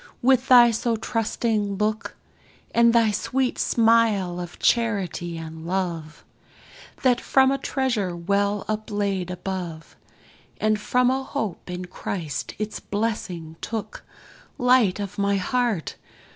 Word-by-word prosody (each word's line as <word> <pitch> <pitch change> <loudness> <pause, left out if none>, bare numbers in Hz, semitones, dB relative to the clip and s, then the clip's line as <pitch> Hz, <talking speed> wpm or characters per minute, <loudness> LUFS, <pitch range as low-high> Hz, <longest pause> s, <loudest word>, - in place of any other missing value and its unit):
with 260 0 +4
thy 240 -2 +8
so 230 +1 0
trusting 220 -2 -1
look, 215 +2 -2 0.6
And 235 0 +5
thy 230 -2 +4
sweet 255 +5 -1
smile 225 -6 +3
of 175 -1 -7
charity 195 -7 0
and 160 0 -8
love, 170 -4 -3 0.8
That 250 -2 +3
from 265 0 +4
a 275 - 0
treasure 235 -10 -1
well 200 +3 0
uplaid 205 -4 -2
above, 180 -3 -5 0.6
And 215 0 +2
from 250 +3 +2
a 265 +1 0
hope 220 - -4
in 180 0 -4
Christ 175 -4 -5
its 215 0 -4
blessing 185 -7 -3
took; 225 -2 -5 0.5
Light 245 -6 +4
of 200 0 -5
my 200 0 +2
heart! 225 - -1
210 Hz, 120 wpm, -24 LUFS, 180-235 Hz, 0.8 s, thy